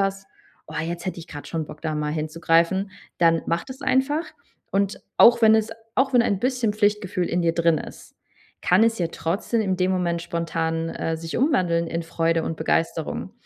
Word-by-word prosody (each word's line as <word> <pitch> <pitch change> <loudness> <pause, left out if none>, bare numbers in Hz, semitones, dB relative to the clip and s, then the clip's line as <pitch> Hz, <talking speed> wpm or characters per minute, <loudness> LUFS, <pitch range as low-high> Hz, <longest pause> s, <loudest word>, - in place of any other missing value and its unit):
hast: 195 0 -1 0.4
„Oh, - - -11
jetzt 170 +1 -5
hätte 185 - -3
ich 165 - -9
gerade 145 -3 -9
schon 165 -2 -2
Bock, 150 0 -11
da 155 -2 -2
mal 150 0 -2
hinzugreifen,“ 165 +4 +1 0.3
dann 165 -1 +4
mach 170 +1 -1
das 265 0 -10
einfach. 270 +5 +1 0.5
Und 200 +1 0 0.2
auch 235 0 +7
wenn 220 0 +7
es 220 0 +1 0.2
auch 265 +1 +2
wenn 245 - +6
ein 200 -5 0
bisschen 245 -1 0
Pflichtgefühl 205 -3 0
in 175 - 0
dir 165 -1 +2
drin 170 -2 +3
ist, - - -11 0.5
kann 185 +5 +5
es 230 0 +2
ja 170 - +1
trotzdem 195 +8 -1
in 190 -3 0
dem 185 0 +1
Moment 175 -2 0
spontan, 165 -1 -2
äh, 165 0 -2
sich 165 0 -5
umwandeln 180 - +2
in 165 0 -3
Freude 165 0 0
und 165 - -3
Begeisterung. 165 +2 -1
175 Hz, 190 wpm, -24 LUFS, 165-210 Hz, 0.5 s, auch